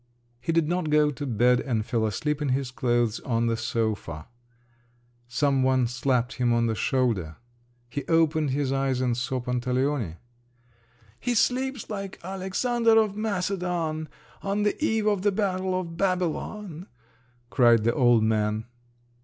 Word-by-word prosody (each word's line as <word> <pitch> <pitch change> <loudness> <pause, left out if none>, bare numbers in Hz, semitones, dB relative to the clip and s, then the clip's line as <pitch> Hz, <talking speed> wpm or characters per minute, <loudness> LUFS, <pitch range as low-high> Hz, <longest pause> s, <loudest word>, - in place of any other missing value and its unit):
He 125 +7 -2
did 165 -2 +2
not 175 -1 -1
go 150 0 +4
to 145 0 -5
bed, 120 +1 +3
and 115 -5 -1
fell 115 -2 0
asleep 150 +8 -2
in 145 - 0
his 130 -1 -1
clothes 120 -3 0
on 115 -2 -1
the 115 -1 +1
sofa. 110 -8 -2 1.0
Some 135 +2 +1
one 130 -1 +3
slapped 125 +1 0
him 120 -2 +2
on 115 0 +2
the 115 - 0
shoulder…. 110 - 0 0.5
He 140 +3 -4
opened 160 -2 +2
his 135 0 0
eyes, 135 -1 0
and 125 -2 +1
saw 125 +1 -2
Pantaleone. 125 - -1 1.0
"He 245 - -1
sleeps 255 +2 0
like 195 -2 -5
Alexander 225 +5 +1
of 215 -2 +1
Macedon 180 -6 -2 0.3
on 200 +1 -1
the 210 +8 0
eve 220 -7 +1
of 205 -3 +2
the 205 +1 +2
battle 185 -2 0
of 165 -2 -6
Babylon!" 185 0 -2 0.6
cried 120 -4 +5
the 115 +1 +2
old 120 -5 +4
man. 110 0 0
140 Hz, 145 wpm, -26 LUFS, 120-185 Hz, 1.0 s, cried